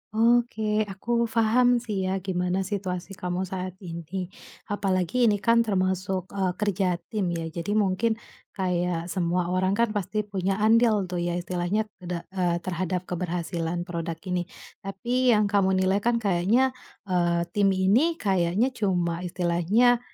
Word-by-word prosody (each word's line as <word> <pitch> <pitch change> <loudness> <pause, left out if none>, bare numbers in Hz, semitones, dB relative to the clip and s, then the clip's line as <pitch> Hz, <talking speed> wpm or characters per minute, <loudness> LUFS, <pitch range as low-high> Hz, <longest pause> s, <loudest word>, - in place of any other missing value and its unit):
Oke 220 -2 +2
aku 235 +4 -1
paham 230 +2 +3 0.2
sih 200 -5 -2
ya - - 0
gimana 180 0 0
situasi 190 -2 -4
kamu 180 -1 -3
saat 185 -1 -5
ini, 175 +2 -5 0.4
apalagi 200 +4 +1
ini 210 - +4
kan 230 +2 +5
termasuk, 185 -1 -1
eee, 190 -2 -1
kerja 195 -3 0 0.2
tim 210 -5 0
ya. 165 - -3
Jadi 170 +5 -3
mungkin 215 +2 +2 0.4
kayak 180 -2 -1
semua 175 -1 0
orang 185 +1 +1
kan 230 0 +2
pasti 210 +1 -2
punya 195 0 -2
andil 220 -2 +4
tuh 180 - -1
ya 175 0 -1
istilahnya 180 +4 -1 0.2
de 175 -1 -5 0.2
eee, 175 -1 +2
terhadap 185 0 -2
keberhasilan 175 -1 -3
product 170 -2 -5
ini. 175 -1 -1 0.3
Tapi 240 +5 +1
yang 210 - +3
kamu 195 -2 +3
nilai 190 +2 +2
kan 235 +3 +1
kayaknya, 205 +8 +3 0.3
eee, 175 -3 +1
tim 205 -1 +2
ini 230 - +3
kayaknya 195 - +1
cuma 175 -5 0
istilahnya, 180 +8 +2
190 Hz, 145 wpm, -26 LUFS, 175-215 Hz, 0.4 s, kan